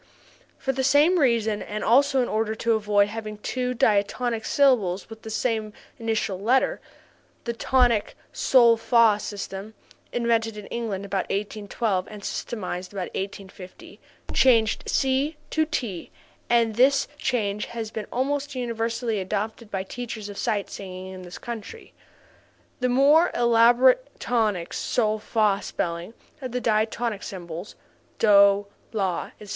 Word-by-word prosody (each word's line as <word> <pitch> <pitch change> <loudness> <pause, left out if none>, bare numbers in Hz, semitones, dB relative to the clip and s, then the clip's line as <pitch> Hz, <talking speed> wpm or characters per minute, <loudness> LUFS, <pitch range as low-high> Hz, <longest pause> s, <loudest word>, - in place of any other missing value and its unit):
For 270 - -1
the 265 0 -2
same 300 +7 +4
reason 230 -6 +2
and 210 +1 -5
also 270 +2 +4
in - - -2
order 220 0 -1
to 230 +1 +1
avoid 205 -2 +2
having 215 -1 -6
two 250 +4 -3
diatonic 220 +2 +1
syllables 225 -9 +2
with 220 0 -10
the 220 - -8
same 220 -1 -1 0.3
initial 220 -4 -1
letter, 245 +6 +1 0.6
the 235 - -3
tonic 240 -2 +2 0.2
sol 235 -3 +5
fa 225 -2 +4
system 205 +1 -6 0.4
(invented 230 -2 0
in 210 - -8
England 210 -5 -3
about 195 -1 -1
1812 205 0 -2
and 210 -1 -10
systematized 185 -5 -4
about 190 -3 -5
1850) 190 -1 -8 0.3
changed 230 -4 +3
SI 275 +3 +1
to 315 0 +1
TI 205 - -4 0.4
and 235 -2 +3
this 265 +5 +3
change 210 -7 -1
has 225 -2 -6
been 215 -2 -5
almost 280 +2 -1
universally 230 -2 -2
adopted 210 +4 -4
by 190 -2 -3
teachers 220 0 -6
of 200 - -9
sight 205 -2 -1
singing 185 -1 -7
in 185 - -9
this 180 -1 -9
country. 240 - -8 0.9
The 250 0 +1
more 285 +7 +5
elaborate 240 +3 +4
tonic 215 -8 0
sol 215 -2 0
fa 210 -2 +1
spelling 170 +6 -4 0.3
of 255 -3 -6
the 250 - 0
diatonic 220 -1 0
syllables 175 0 -7 0.4
(DOH, 200 -1 +5 0.3
LAH, 190 -5 -1
etc.) 210 - -11
225 Hz, 135 wpm, -25 LUFS, 205-245 Hz, 0.9 s, sol